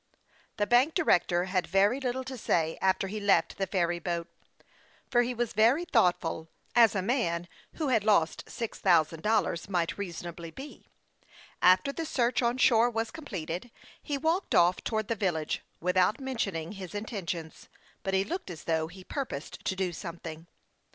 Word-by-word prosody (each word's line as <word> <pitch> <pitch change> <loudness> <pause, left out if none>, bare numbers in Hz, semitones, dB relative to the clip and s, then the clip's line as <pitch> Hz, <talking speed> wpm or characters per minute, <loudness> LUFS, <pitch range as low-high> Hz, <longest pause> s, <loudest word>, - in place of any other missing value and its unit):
The 205 - +2
bank 250 +8 +4
director 175 - +3
had 185 -1 -1
very 200 +7 +3
little 260 -1 -2
to 260 0 -6
say 165 -8 0
after 190 0 +2
he 215 +3 -4
left 195 -3 +2
the 195 - 0
ferry 175 -3 0
boat; 170 -1 -3 0.8
but 240 - +4
he 250 +1 -3
was 240 -1 -2
very 235 - +4
thoughtful, 175 - +1 0.3
as 230 -3 +6
a 190 - 0
man 175 -7 0 0.3
who 310 -4 -2
had 225 -5 +3
lost 200 -7 +2
six 230 -2 -5
thousand 165 -3 +3
dollars 210 -4 0
might 175 -1 -1
reason 175 -4 -5
ably 170 -1 -7
be. 270 - -11 0.7
After 185 +10 +5
the 325 +2 -4
search 245 -3 +1
on 240 +1 +1
shore 235 -2 +5
was 225 -1 -2
completed, 190 - -5 0.3
he 290 -2 -2
walked 325 +6 0
off 175 +1 +5
towards 220 -2 -1
the - - +1
village 175 -8 -1 0.2
without 180 - +2
mention 250 -8 -2
ing 165 0 -4
his 195 -1 -8
intentions, 185 -7 -5 0.3
but 195 0 -1
he 190 - +3
looked 345 - -5
as 170 -2 -8
though 160 -1 0
he 185 +3 -12
pur 275 +7 -3
posed 140 - -8
to 190 - 0
do 185 -2 -1
something. 165 -1 -7
195 Hz, 175 wpm, -29 LUFS, 170-240 Hz, 0.8 s, as